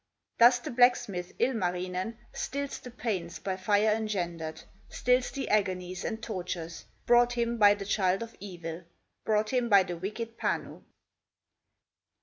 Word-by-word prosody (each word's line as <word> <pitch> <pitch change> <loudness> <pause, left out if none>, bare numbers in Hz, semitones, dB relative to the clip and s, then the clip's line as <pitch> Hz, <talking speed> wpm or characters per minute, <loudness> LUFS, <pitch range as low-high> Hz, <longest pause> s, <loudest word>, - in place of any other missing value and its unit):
Thus 240 +1 +8
the 240 - -6
blacksmith, 235 -7 +2
Ilmarinen, 185 -3 -1 0.2
Stills 280 +1 -4
the 250 - -10
pains 200 -8 -3
by 190 -1 -3
fire 205 +3 +2
engendered, 175 -7 -3 0.3
Stills 250 0 +2
the 275 - -4
agonies 185 -3 0
and 220 -1 -4
tortures 175 -5 -5 0.2
Brought 240 0 +5
him 235 0 -1
by 205 -1 +7
the 200 -1 -7
child 195 0 +1
of 230 - -10
evil, 175 -3 -7 0.4
Brought 215 0 +1
him 245 -2 +1
by 200 -2 +7
the 175 -1 -5
wicked 225 +5 -5
Panu. - - -2
205 Hz, 135 wpm, -29 LUFS, 180-235 Hz, 0.4 s, Thus